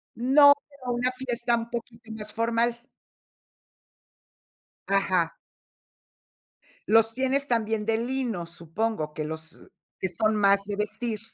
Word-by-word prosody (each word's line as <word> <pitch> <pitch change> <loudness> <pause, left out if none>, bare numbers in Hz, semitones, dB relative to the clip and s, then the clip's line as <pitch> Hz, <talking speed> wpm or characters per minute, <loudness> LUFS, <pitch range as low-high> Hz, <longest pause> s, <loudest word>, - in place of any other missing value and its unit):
No, 285 +4 +7 0.2
pero 280 -3 -16
a 245 - -1
una 245 +1 0
fiesta 245 -2 -1
un 230 0 -4
poquito 235 -1 -7
más 215 -1 -6
formal. 230 +1 +1 2.1
Ajá. 185 -4 +1 1.5
Los 225 0 +5
tienes 265 +3 0
también 220 -3 0
de 225 0 +1
lino, 235 -7 -2
supongo, 170 0 -3
que 155 - -4
los 160 +1 -8 0.3
que 190 - -1
son 215 +4 +1
más 200 -1 +4
de 205 - -3
vestir. 215 +2 -3
225 Hz, 120 wpm, -26 LUFS, 200-240 Hz, 2.1 s, No